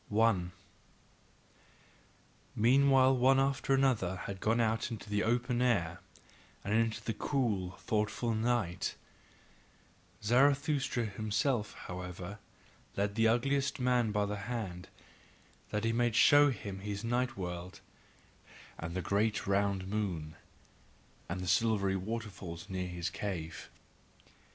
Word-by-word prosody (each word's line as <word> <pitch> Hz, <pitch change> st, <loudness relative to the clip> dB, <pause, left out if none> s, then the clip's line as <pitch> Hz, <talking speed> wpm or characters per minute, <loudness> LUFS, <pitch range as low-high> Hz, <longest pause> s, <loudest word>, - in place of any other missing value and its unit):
1. 105 Hz, -5 st, +2 dB, 2.0 s
Meanwhile 130 Hz, +3 st, +5 dB
one 130 Hz, +2 st, +4 dB
after 135 Hz, 0 st, +1 dB
another 120 Hz, -9 st, +2 dB
had 95 Hz, 0 st, -6 dB
gone 115 Hz, +4 st, +1 dB
out 110 Hz, 0 st, +1 dB
into 110 Hz, -3 st, -7 dB
the 105 Hz, 0 st, 0 dB
open 120 Hz, +2 st, +1 dB
air, 95 Hz, -10 st, +1 dB, 0.6 s
and 100 Hz, -, -2 dB
into 110 Hz, -1 st, +1 dB
the 115 Hz, -, -2 dB
cool, 105 Hz, -8 st, -1 dB
thoughtful 110 Hz, +3 st, -1 dB
night; 110 Hz, -6 st, 0 dB, 1.3 s
Zarathustra 135 Hz, +1 st, +2 dB
himself, 110 Hz, +3 st, -1 dB
however, 90 Hz, +2 st, -7 dB, 0.6 s
led 100 Hz, 0 st, 0 dB
the 115 Hz, +1 st, +3 dB
ugliest 135 Hz, +4 st, +1 dB
man 125 Hz, -3 st, +2 dB
by 105 Hz, -1 st, +1 dB
the 105 Hz, 0 st, -3 dB
hand, 95 Hz, -7 st, -4 dB, 0.8 s
that 105 Hz, +1 st, -2 dB
he 115 Hz, 0 st, +1 dB
might 120 Hz, -1 st, +1 dB
show 145 Hz, +4 st, +7 dB
him 100 Hz, -6 st, -5 dB
his 100 Hz, +1 st, -5 dB
night 120 Hz, +1 st, 0 dB
world, 90 Hz, -1 st, -5 dB, 1.0 s
and 85 Hz, +1 st, -5 dB
the 95 Hz, -, -2 dB
great 105 Hz, +2 st, +1 dB
round 100 Hz, -1 st, +1 dB
moon, 90 Hz, -7 st, -3 dB, 0.9 s
and 95 Hz, -, -3 dB
the 90 Hz, -, -5 dB
silvery 100 Hz, -2 st, +2 dB
water 110 Hz, +3 st, -4 dB
falls 90 Hz, +1 st, -8 dB
near 90 Hz, -1 st, -2 dB
his 90 Hz, -2 st, -4 dB
cave. 90 Hz, -4 st, -5 dB
110 Hz, 120 wpm, -32 LUFS, 95-120 Hz, 2.0 s, show